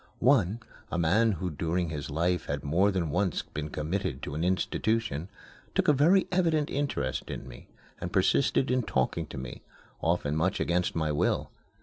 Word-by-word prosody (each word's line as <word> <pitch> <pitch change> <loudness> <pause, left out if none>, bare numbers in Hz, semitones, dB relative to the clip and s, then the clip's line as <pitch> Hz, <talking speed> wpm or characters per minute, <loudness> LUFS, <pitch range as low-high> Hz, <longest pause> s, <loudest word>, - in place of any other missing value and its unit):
One, 115 -4 +3 0.3
a - - -1
man 100 +7 +3
who 90 0 -3
during 85 +3 -1
his 75 -4 -5
life 85 +3 0
had 70 0 -3
more 85 +8 +3
than 90 -6 -1
once 95 +1 0
been 75 0 -5
committed 75 -2 -3
to 70 - -4
an 80 +3 -2
institution, 95 -1 0 0.5
took - - +2
a 150 - +7
very 170 +8 +4
evident 165 -5 +2
interest 135 - -2
in - - -6
me - - -12 0.3
and - - -4
persisted 130 - +2
in 130 0 +3
talking 105 -7 -1
to - - -8
me, 65 -2 -7 0.4
often 80 -3 +1
much 85 +4 +1
against 90 +1 0
my 80 -2 0
will. 75 - 0
90 Hz, 170 wpm, -29 LUFS, 75-110 Hz, 0.5 s, a